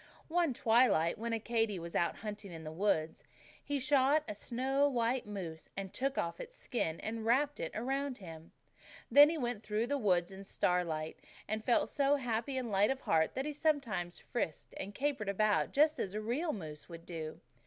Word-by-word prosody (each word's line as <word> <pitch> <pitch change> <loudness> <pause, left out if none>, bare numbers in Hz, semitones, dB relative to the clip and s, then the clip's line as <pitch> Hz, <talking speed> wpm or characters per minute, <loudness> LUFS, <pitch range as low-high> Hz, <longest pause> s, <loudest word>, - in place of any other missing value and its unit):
"One 340 -2 +2
twilight, 220 -9 +3
when 235 +1 -2
Accadee 225 -2 0
was 170 0 -7
out 170 - +1
hunting 205 -2 -6
in 165 -1 -8
the 155 - -6
woods, 160 -3 0 0.4
he 290 - -1
shot 285 +2 +3
a - - -3
snow 265 +6 +1
white 240 -2 0
moose; 175 -6 -6
and 195 -1 -3
he - - -37
took 270 +1 -1
off 170 - -2
its - - -8
skin 165 -10 -2
and 225 0 -4
wrapped 280 +6 +2
it 165 - -3
around 270 +3 -1
him. 165 -4 -10 0.6
Then 290 +1 +9
he 330 - -1
went 245 -4 -1
on - - -18
through 215 +1 -1
the 285 +3 -1
woods 180 -5 +2
in 190 - -9
the - - -8
starlight; 170 -5 -1 0.3
and 215 +1 -2
he - - -26
felt 240 - +4
so 280 0 +2
happy 250 0 -2
and 245 -4 -2
light 200 +1 +4
of 265 0 -1
heart 160 -1 +2
that 265 - -1
he 300 - -3
sometimes 275 - 0
frisked 165 -10 -4
and 200 +1 -6
capered 265 -6 -1
about 210 +1 +2
just 305 +2 +3
as 195 +1 -2
a - - -1
real 255 +10 -1
moose 155 - -7
would 165 0 -10
do. 160 -3 -6
220 Hz, 205 wpm, -34 LUFS, 180-270 Hz, 0.6 s, Then